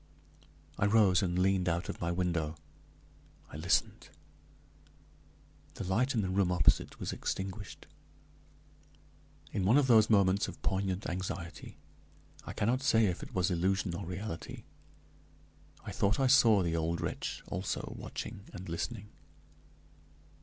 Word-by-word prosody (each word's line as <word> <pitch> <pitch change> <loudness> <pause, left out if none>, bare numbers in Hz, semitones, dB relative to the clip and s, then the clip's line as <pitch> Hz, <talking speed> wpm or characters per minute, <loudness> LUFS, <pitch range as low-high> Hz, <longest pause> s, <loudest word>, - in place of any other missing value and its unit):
I 100 - +3
rose 100 -4 +4
and 90 -2 -1
leaned 95 -1 +2
out 85 +1 -1
of - - -6
my 85 0 0
window; 85 -3 -1 1.0
I - - -7
listened. - - 0 1.7
The - - -5
light 120 +9 +1
in 110 - +2
the 95 - -2
room 95 -1 +2
opposite 90 -2 +2
was - - -3
extinguished. 95 +2 -5 1.7
In 95 - -1
one 110 +8 +5
of 145 - +4
those 110 -4 +5
moments 100 -1 +3
of - - -9
poignant 95 0 -1
anxiety, 90 -1 -5 0.7
I - - -5
cannot 125 +5 0
say 115 -6 +4
if 90 -3 -1
it - - -9
was 95 +1 +1
illusion 95 +1 0
or 85 - -4
reality, 90 -1 -6 1.2
I - - -5
thought 100 +5 +1
I 135 - +3
saw 115 -6 +6
the 85 -1 -1
old 85 +1 -1
wretch - - -4
also 95 +2 -4
watching 100 - -7
and 95 - -8
listening. 100 +6 -4
95 Hz, 135 wpm, -32 LUFS, 90-105 Hz, 1.7 s, saw